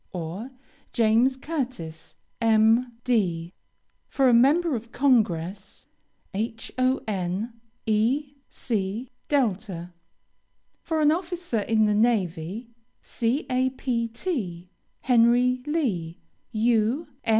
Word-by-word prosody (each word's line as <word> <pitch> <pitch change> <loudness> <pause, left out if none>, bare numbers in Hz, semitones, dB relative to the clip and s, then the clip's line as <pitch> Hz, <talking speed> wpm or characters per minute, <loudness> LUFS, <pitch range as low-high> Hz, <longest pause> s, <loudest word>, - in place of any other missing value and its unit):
or, 180 +7 -5 0.4
JAMES 235 +3 +3
CURTIS, 250 - -5 0.3
M.D. 225 -5 +2 0.6
For 270 -2 +3
a - - +4
member 295 +7 +4
of 230 0 -6
Congress: 200 - 0 0.5
HON. 225 -2 -2 0.3
E. 245 +7 +1 0.2
C. 220 +1 -3 0.2
DELTA. 200 - -1 0.9
For 320 -1 -1
an 300 0 +5
officer 345 - -2
in 220 +1 +2
the 210 - +2
navy: 205 -1 0 0.3
CAPT. 255 -1 -1 0.8
HENRY 245 +1 +4
LEE, 200 - -1 0.3
U. 230 +5 +1
230 Hz, 80 wpm, -25 LUFS, 205-255 Hz, 0.9 s, an